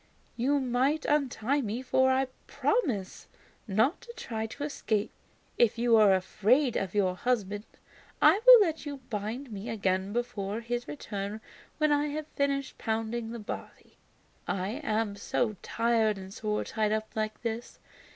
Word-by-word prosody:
You 275 +4 +2
might 265 +4 +1
untie 280 -2 +1
me, 230 +2 -3
for 260 +1 +3
I 265 +1 +2 0.2
promise 255 - -1 0.4
not 225 - +2
to 470 - -10
try 225 - -4
to 285 +6 -7
escape. 220 -8 -1 0.5
If 235 -1 +4
you 235 0 +4
are 210 -3 +6
afraid 225 +8 +2
of 195 0 -2
your 190 -3 +2
husband, 205 -2 -1 0.5
I 330 +8 +6
will - - +11
let 325 -5 0
you 290 -2 -5
bind 225 +5 -4
me 205 +3 -6
again 195 -3 0
before 220 -2 -3
his 240 +1 -3
return 205 -6 -5 0.4
when 305 -1 +2
I 290 0 +2
have 300 +1 -4
finished 280 -1 -1
pounding 225 +1 -2
the 235 - -5
barley. 210 - -8 0.5
I 200 +9 -2
am 215 -3 0
so 215 +1 -1
tired 230 -2 +1
and 190 0 -9
sore 210 -1 -2
tied 215 -2 -1
up 215 0 -1
like 215 0 -2
this. 230 0 -4
230 Hz, 150 wpm, -29 LUFS, 210-270 Hz, 0.5 s, will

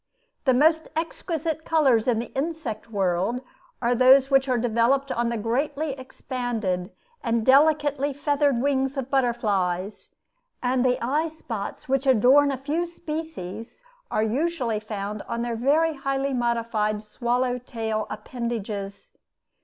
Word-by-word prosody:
The 260 -2 +4
most 320 +4 +3
exquisite 320 -1 -3
colors 270 -10 +3
in 240 -3 +3
the 235 - -5
insect 270 -7 -4
world 195 +3 0 0.4
are 240 +1 +3
those 260 +2 +6
which 270 0 +4
are 250 - +2
developed 245 +4 +1
on 235 0 0
the 235 - -2
greatly 280 +7 -1
expanded 245 -8 -3 0.3
and 230 -2 0
delicately 290 0 +4
feathered 285 -2 +1
wings 270 -1 0
of 270 -1 -4
butterflies; 210 -7 0 0.5
and 250 0 +2
the 250 -1 +2
eye 300 +6 +1
spots 235 -10 -6
which 270 +1 0
adorn 265 +4 +5
a 270 - -2
few 305 +6 -2
species 310 - -6 0.3
are 215 - +1
usually 250 -1 0
found 210 -1 -5
on 235 0 -2
their 240 -1 -2
very 300 +7 +2
highly 275 -1 -2
modified 230 -3 0
swallow 245 +3 -1
tail 225 -3 -3
appendages. 210 -5 -5
250 Hz, 130 wpm, -25 LUFS, 225-280 Hz, 0.5 s, those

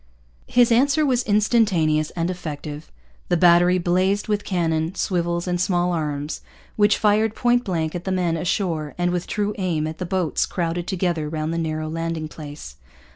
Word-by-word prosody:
His 245 -1 +4
answer 280 +6 +3
was 255 -3 +2
instantaneous 200 - +2
and 170 +1 -1
effective. 150 -3 -7 0.4
The 175 - +3
battery 175 +1 +5
'blazed 185 +3 +1
with 210 -1 0
cannon, 165 -1 -1
swivels, 170 -2 -1
and 175 -1 0
small 180 -1 +1
arms,' 150 -3 -3 0.3
which 210 0 +4
fired 215 +1 +2
point 245 0 +2
blank 165 -6 -2
at 175 -1 -5
the 190 - -1
men 180 -3 0
ashore 165 -3 -2
and 175 0 +1
with 175 -1 -2
true 210 0 -1
aim 170 -5 0
at 155 0 -6
the 180 - -3
boats 185 -3 0
crowded 170 -1 -2
together 175 -5 -1
round 155 +1 -3
the 170 - -1
narrow 155 -1 -2
landing 165 0 -3
place. 145 - -10
175 Hz, 170 wpm, -22 LUFS, 160-195 Hz, 0.4 s, battery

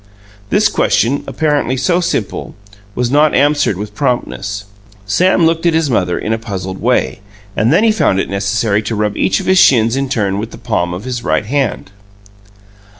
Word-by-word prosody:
This 210 +1 +3
question, 140 - +1
apparently 145 -4 0
so 170 +7 +1
simple, 170 - -3 0.4
was 125 0 -1
not 150 +1 +3
answered 145 -8 +2
with 105 +1 -6
promptness. 105 -6 -2 0.4
Sam 175 - +2
looked 165 +1 +1
at 165 - +2
his 160 -4 +1
mother 90 -6 0
in 110 - -2
a 110 - -2
puzzled 95 -4 -6
way, 125 -1 0 0.4
and 110 +3 +2
then 170 +7 +4
he 225 - +4
found 100 - +1
it - - -1
necessary 100 +1 0
to 110 +1 -4
rub 105 0 -1
each - - +1
of 190 - -6
his 185 0 +4
shins 115 -5 +4
in 135 0 -2
turn 100 -6 -1
with 110 +2 -4
the - - -11
palm 85 0 -2
of 90 - -7
his 125 -1 -4
right 105 - 0
hand. 130 -6 -2
120 Hz, 185 wpm, -15 LUFS, 105-150 Hz, 0.4 s, then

